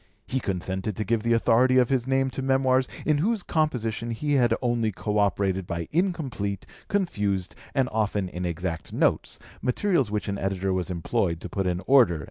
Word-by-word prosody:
He 130 - -1
consented 95 0 -3
to 110 - -2
give 115 +2 0
the 115 +1 +2
authority 125 +3 +4
of 125 -2 +4
his 130 -2 0
name 135 0 +1
to 135 - -4
Memoirs 130 -1 +2 0.2
in 150 -2 +2
whose 210 +4 0
composition 120 -8 -1
he 145 +6 -1
had 125 -4 +3
only 120 -3 0
co 105 +1 -2
operated 95 -2 +1
by 85 -1 -3
incomplete, 145 - -1 0.2
confused, 105 - -1 0.2
and 135 -2 +3
often 105 -3 0
inexact 90 -2 -4
notes, - - +1 0.2
materials 140 - +1
which 105 0 -2
an 100 -1 -2
editor 95 0 -1
was 95 0 -2
employed 85 -1 -1
to - - -6
put 95 -2 -1
in 90 0 -1
order." 120 - +5
110 Hz, 175 wpm, -26 LUFS, 95-130 Hz, 0.2 s, order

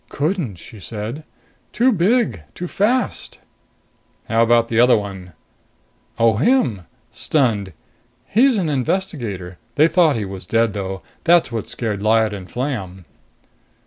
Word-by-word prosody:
"Couldn't," 150 - -2
she 105 +5 -13
said. 115 +8 -6 0.5
"Too 250 +3 +3
big. 185 - +1
Too 180 - -5
fast." 235 +8 -1 0.9
"How 115 +1 +2
about 115 0 +4
the 115 0 0
other 125 0 +6
one?" 95 -4 -7 0.8
"Oh, 115 -2 +3
him. 120 - +1 0.2
Stunned. 110 -10 0 0.5
He's 245 +2 +3
an 180 -5 0
investigator. 125 - -3 0.2
They 155 +2 +5
thought 165 -2 +3
he 110 -3 -2
was 95 -2 -8
dead, 115 -2 +2
though. 95 -2 -5 0.2
That's 170 -5 +4
what 115 -3 -4
scared 105 -4 -3
Lyad 110 0 +2
and 95 -2 -8
Flam." 100 - -4
115 Hz, 130 wpm, -20 LUFS, 100-165 Hz, 0.9 s, other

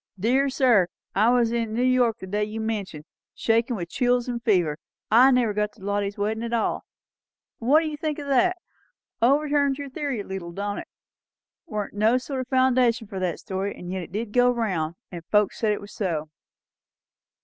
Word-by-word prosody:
Dear 260 +7 +2
sir, 245 -9 +4 0.3
I 215 +4 +4
was 240 -2 +3
in 230 -2 -1
New 245 - +1
York 250 -3 +3
the 190 - -8
day 205 +3 -1
you 215 +1 -4
mention, 205 -9 -4 0.3
shakin' 230 +2 +1
with 175 -4 -5
chills 245 0 +1
and 240 -1 -3
fever, 175 -8 +2 0.3
and 250 +4 +7
never 235 -4 +2
got 210 0 -1
to - - -17
Lottie's 200 0 -1
weddin' 215 +2 -1
at 235 0 -4
all.' 225 - -1 0.7
What 275 +7 +4
do 325 - -2
you 300 -1 -5
think 305 -1 -2
o' 290 - -6
that? 360 +7 +3 0.6
Overturns 285 +2 +3
your 285 -2 -7
theory 275 -5 -3
a - - -7
leetle, 190 -3 -6
don't 205 +2 -3
it? - - -8 0.8
Warn't 210 -8 -4
no 215 +4 +3
sort 255 0 -4
o' - - -44
foundation 255 -3 +3
for 195 -2 -6
that 180 -4 -1
story; 195 +1 -3
and 175 0 -8
yet 190 0 -3
it 170 - -9
did 210 +2 -4
go 245 0 +5
round, 185 -10 -1 0.2
and 170 -2 -7
folks 210 0 +1
said 220 -2 +2
it 210 - -2
was 205 +1 -11
so." 160 -6 -3
225 Hz, 195 wpm, -25 LUFS, 200-255 Hz, 0.8 s, and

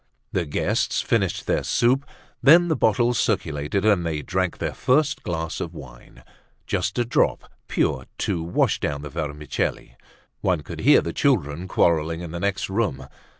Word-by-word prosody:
The 85 -4 -1
guests 70 - 0
finished - - 0
their - - 0
soup. 130 +4 +2 0.3
Then 170 +5 +6
the 160 - +2
bottles 120 +1 +2
circulated 85 -1 -1
and 100 -5 +4
they 80 -3 -2
drank 95 -1 -1
their - - -3
first 150 +3 +1
glass 80 -2 -3
of 85 0 -5
wine, 65 -5 -13 0.4
just - - -2
a 120 - +1
drop 120 - 0 0.2
pure, - - 0
to 85 - -1
wash 85 +2 +1
down 70 0 -3
the 75 - -7
vermicelli. 75 -5 -3 0.4
One 90 -5 0
could - - -8
hear - - +6
the 85 - -4
children 90 - 0
quarrelling 85 -2 +1
in 85 -2 -7
the 85 - -5
next 100 +1 -1
room. 95 - -1
85 Hz, 160 wpm, -23 LUFS, 75-110 Hz, 0.4 s, Then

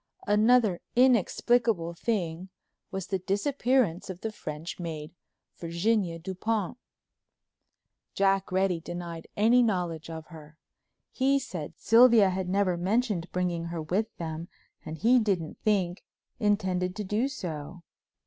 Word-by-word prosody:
Another 215 -2 +3
inexplicable 235 -6 +3
thing 180 -3 -2 0.4
was 190 -2 -4
the 190 - -2
disappearance 205 - 0
of 185 -1 -7
the 220 - -3
French 160 -4 -7
maid, 160 -2 -6 0.5
Virginia 170 +1 0
Dupont. 195 +5 -3 1.4
Jack 195 -1 +2
Reddy 185 -2 +1
denied 170 0 -7
any 230 +4 +5
knowledge 175 -8 -1
of 160 -1 -7
her. 155 -2 -13 0.5
He 275 +1 +2
said 180 - -6
Sylvia 230 -4 +6
had 185 0 -3
never 190 -2 +1
mentioned 195 -1 0
bringing 175 -2 -1
her 170 -1 -4
with 190 +8 0
them 165 0 -5 0.4
and 160 0 -6
he 245 +9 +4
didn't 190 -8 -1
think 190 -4 0 0.4
intended 190 -4 0
to 210 - -3
do 210 +6 0
so. 170 - -6
185 Hz, 120 wpm, -28 LUFS, 170-220 Hz, 1.4 s, Sylvia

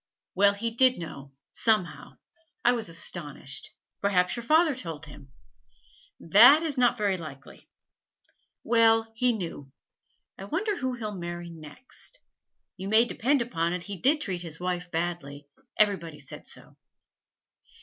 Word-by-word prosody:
'Well, 200 +1 +4
he 230 +3 -3
did 255 +2 +4
know, 140 -5 -8 0.2
somehow; 215 -6 -1 0.5
I 240 - +6
was 230 -6 -2
astonished. 145 -5 -5 0.3
Perhaps 185 -3 +2
your 235 - -5
father 315 +5 +3
told 165 - -7
him?' 145 -2 -14 0.9
'That 240 - +7
is 310 -4 -2
not 245 -1 +3
very 200 -3 0
likely.' 145 -5 -11 0.9
'Well, 225 -1 +3
he 250 +2 +2
knew. 165 - -6 0.7
I 195 - -7
wonder 400 - -1
who 260 -5 -2
he'll 215 -3 -5
marry 175 -2 -6
next. 160 - -13 0.6
You 190 +1 -6
may 220 +2 +5
depend 255 +3 +1
upon 170 -7 -2
it 180 -1 -4
he 200 +2 -6
did 280 - +2
treat 185 - -3
his 165 -2 -7
wife 180 0 -3
badly; 165 -4 -4 0.3
everybody 180 -7 +1
said 140 - -12
so. - - -13
195 Hz, 140 wpm, -27 LUFS, 165-235 Hz, 0.9 s, That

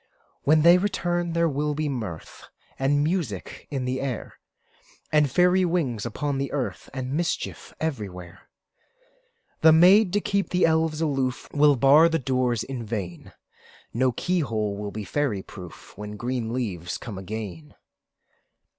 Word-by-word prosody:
When 155 +1 +4
they 170 +2 +7
return, 175 -3 -1
there 170 0 +2
will 150 0 -1
be 155 0 -1
mirth 110 - -6 0.3
And 145 +2 +2
music 150 - -3
in 135 -3 -3
the 130 +1 -2
air, 130 -4 -5 0.7
And 150 -2 +4
fairy 180 +6 +4
wings 140 - -1
upon 140 +4 -2
the 140 - -2
earth, 140 -3 -4
And 130 0 -4
mischief 170 +3 -3
everywhere. 95 - -5 1.1
The 160 - +8
maids, 185 +6 +6
to 205 - +3
keep 200 -1 -1
the 180 - +3
elves 160 -1 +1
aloof, 135 -5 -1
Will 145 0 +5
bar 140 +6 +6
the 165 - +1
doors 125 -4 0
in 130 -3 -5
vain; 100 -6 -6 0.6
No 130 +2 +2
key 180 +9 -1
hole 110 -8 -1
will 105 0 -5
be 105 +1 -6
fairy 115 -5 -1
proof, 90 -4 -12
When 105 +1 -7
green 120 -1 -3
leaves 95 -9 -3
come 105 -5 -7
again. 95 -6 -7
135 Hz, 145 wpm, -25 LUFS, 110-160 Hz, 1.1 s, The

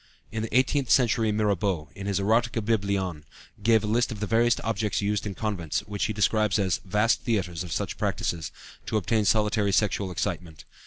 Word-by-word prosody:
In 110 0 -3
the 110 +2 0
eighteenth 130 0 +1
century 115 -3 +3
Mirabeau, 100 -7 0
in 100 +4 -7
his 100 -1 0
Erotikca 115 +2 +1
Biblion 100 -7 -1 0.4
gave 110 0 +4
a - - -2
list 115 +3 +1
of 110 - -6
the 105 - -1
various 115 +2 +2
objects 110 -2 -1
used 105 0 -1
in 100 - -5
convents 95 -8 -2
(which 105 -1 -3
he - - -1
describes 105 0 +2
as 95 0 0
"vast 105 +4 +1
theatres" 90 -7 -1
of 90 - -8
such - - -3
practices) 80 -3 -2 0.4
to 110 - 0
obtain 110 +2 +1
solitary 105 0 +2
sexual 100 -1 +1
excitement. 85 -3 -4
105 Hz, 180 wpm, -26 LUFS, 95-110 Hz, 0.4 s, gave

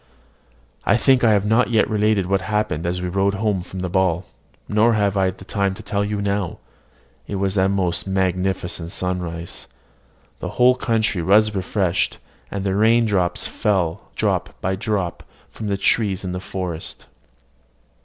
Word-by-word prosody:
I - - +3
think 130 +1 +4
I 110 -2 +6
have 100 -1 +2
not 115 +4 +3
yet 115 -2 +3
related 105 -2 +2
what 95 +1 +1
happened 105 -6 -1
as 90 +1 -2
we - - -1
rode 100 +2 +1
home 100 -2 0
from 95 +1 -7
the 90 - -1
ball, 95 -1 +1 0.4
nor 110 +3 +3
have 100 -2 +1
I 95 -1 +3
time 95 +1 -2
to - - -10
tell 100 0 -1
you 105 0 -2
now. 100 -3 -1 0.7
It 100 - -4
was 95 0 0
a 95 -1 +3
most 95 -2 0
magnificent 95 -2 -1
sunrise: 90 -2 -4 0.7
the - - -4
whole 125 +1 +6
country 110 -7 0
was 105 +5 +4
refreshed, 95 -2 0 0.3
and 100 -1 -4
the 95 -1 0
rain 115 +3 +4 0.3
fell 95 -3 -1
drop - - -1
by 95 +1 -1
drop 100 -4 -2 0.3
from 110 - -6
the 100 -1 0
trees 100 -1 +1
in 90 - -3
the 90 - -3
forest. 90 -3 -5
100 Hz, 160 wpm, -21 LUFS, 90-105 Hz, 0.7 s, I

